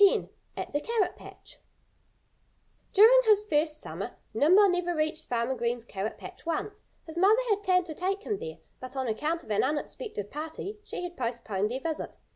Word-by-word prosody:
X 400 - +5 0.3
AT - - -5
THE 290 - +1
CARROT 455 -1 0
PATCH - - -13 1.3
During 450 +5 +8
his 425 -1 +5
first 305 -2 +1
summer - - -5 0.2
Nimble 370 +8 +6
never 355 -1 0
reached 310 +1 0
Farmer 235 +1 0
Green's 235 -1 -2
carrot 205 0 -4
patch - - -10
once. 405 +6 -3 0.2
His 330 +1 -5
mother 405 +4 +6
had 410 0 +2
planned 365 -3 +3
to 320 - -5
take 390 +5 -2
him 415 - -1
there. 475 +3 -7 0.2
But 255 +1 -8
on 260 -1 -1
account 310 +9 -1
of - - -9
an 205 - +3
unexpected 295 - -3
party 320 +8 -5
she 360 - -5
had 350 0 -5
postponed 230 - -2
their 260 +3 -3
visit. 320 0 -3
320 Hz, 180 wpm, -29 LUFS, 260-395 Hz, 1.3 s, During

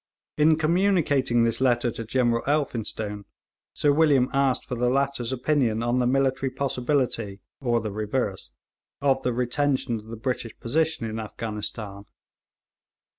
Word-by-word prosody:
In 155 +1 +5
communicating 155 -8 +2
this 115 +2 0
letter 120 -2 +2
to 115 - -6
General 120 0 +1
Elphinstone, 110 -8 -2 0.5
Sir 145 - +2
William 145 -4 +4
asked 135 -2 +1
for - - -6
the 125 0 +1
latter's 135 -2 0
opinion 125 -4 +1
on 120 +1 +1
the 125 - +2
military 135 +1 +1
possibility, 125 -5 -1 0.2
or 120 -3 +1
the 110 - -4
reverse, 105 -1 -2 0.5
of 135 -1 +2
the 125 - 0
retention 125 0 0
of 105 - -15
the 115 0 -7
British 120 -1 -4
position 160 +1 0
in 110 0 -4
Afghanistan. 105 -2 -5
125 Hz, 135 wpm, -25 LUFS, 115-140 Hz, 0.5 s, In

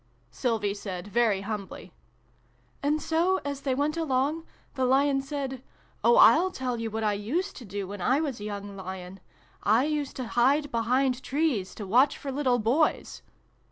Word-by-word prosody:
Sylvie 220 -5 -1
said 195 -2 -6
very 220 -3 +2
humbly. 205 -1 -6 0.4
" - - -37
And 295 +2 +1
so, 340 +5 +1
as 280 -1 -4
they 265 -2 0
went 290 +3 0
along, 305 +1 0 0.3
the 265 - -2
Lion 270 +1 +3
said 270 -2 -4 0.2
* - - -35
Oh, 475 - +5
I'll 370 -6 +7
tell 255 -8 -3
you 225 - -2
what 220 +1 -3
I 210 -1 +2
used 265 - -2
to 245 - -9
do 200 -1 -5
when 200 0 -7
I 260 +9 +2
was 285 -7 -3
a - - -7
young 205 -1 -6
Lion. 190 0 -8 0.4
I 225 +6 +3
used 300 -2 -2
to 255 - -4
hide 275 +5 +2
be 235 - 0
hind 255 +2 +1
trees, 265 - -1
to 210 - -6
watch 255 +9 +3
for 275 - -5
little 260 -3 +1
Boys.' 250 +8 0
255 Hz, 185 wpm, -27 LUFS, 210-285 Hz, 0.4 s, I'll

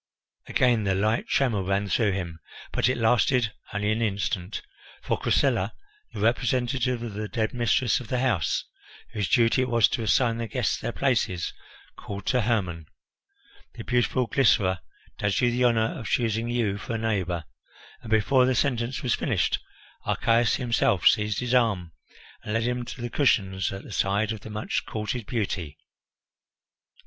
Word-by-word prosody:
Again 120 -4 +2
the 95 -1 +1
light 110 +4 0
tremour 120 -8 +1
ran 100 +2 0
through 105 -1 +2
him, 85 -4 -4 0.3
but - - +2
it 130 - 0
lasted 120 0 +2 0.2
only 105 0 0
an 110 +2 0
instant; 100 -2 -2 0.4
for - - 0
Chrysilla, - - +1 0.4
the - - -6
representative 125 +1 +1
of 115 -3 -5
the 105 +1 -4
dead 110 0 -2
mistress 120 -1 +2
of 125 - -9
the 125 - -1
house, 120 -9 0 0.5
whose 105 -3 -2
duty 120 +1 +4
it 130 - -1
was 115 -2 +5
to 120 - -2
assign 115 +1 +2
the 115 - -3
guests 125 -2 -1
their - - -3
places, 110 -10 0 0.4
called 100 -1 -7
to 125 -2 +2
Hermon, 95 -9 -1 0.9
"The - - -7
beautiful 125 +1 +1
Glycera 100 -9 +3 0.4
does 105 -1 +1
you 120 -2 +3
the 125 +1 +2
honour 115 -2 +1
of 115 - -6
choosing 115 -1 0
you 110 -5 0
for 115 - -4
a - - 0
neighbour" 95 -7 -1 0.6
and, 115 - -10
before 125 +4 +4
the 130 - +2
sentence 125 0 0
was 125 - +1
finished, - - 0 0.4
Archias 115 +1 +2
himself 115 -7 +1
seized 105 0 +3
his 125 0 -2
arm 105 -9 +2 0.5
and 105 - -4
led 115 - +1
him 125 0 -1
to 120 - -8
the 120 0 -4
cushions 95 - +1
at 95 0 -7
the - - -11
side 100 +2 +1
of 110 - -4
the 110 - -10
much 105 0 -2
courted 110 +1 -4
beauty. 95 - -3
115 Hz, 165 wpm, -26 LUFS, 100-120 Hz, 0.9 s, was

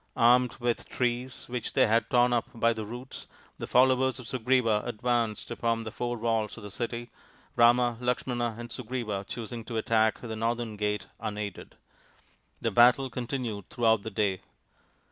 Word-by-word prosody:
Armed 125 0 +5
with 120 -1 -3
:rees 125 +1 -1
which 120 -2 -4
they - - +5
had 115 +1 +2
torn 125 0 +4
up 120 -1 0
by 115 0 +3
the 110 -2 -6
roots, 125 +4 -8 0.3
the: - - -4
ollowers 130 +1 +4
of 125 -4 -9
Sugriva 120 -3 +2
advanced 120 -1 -1
upon 115 -1 -1
the 110 - -6
four 120 +1 -3
walls 110 -2 -1
)f 110 - -10
the 105 - -8
city, 120 +1 -4 0.4
Rama, 120 0 +4
Lakshmana, 125 -2 -1
and 120 0 -8
Sugriva 115 -5 -4
choosing 115 0 -5
:o 115 - -4
attack 110 0 +2
the 115 -2 -6
northern 115 0 -2
gate 105 -1 -1
unaided. 105 -2 -5 0.9
The - - 0
battle 125 +2 +5
:ontinued 120 -5 -4
throughout 115 -3 +2
the 110 - -5
day. 100 -4 0
120 Hz, 160 wpm, -28 LUFS, 110-125 Hz, 0.9 s, Armed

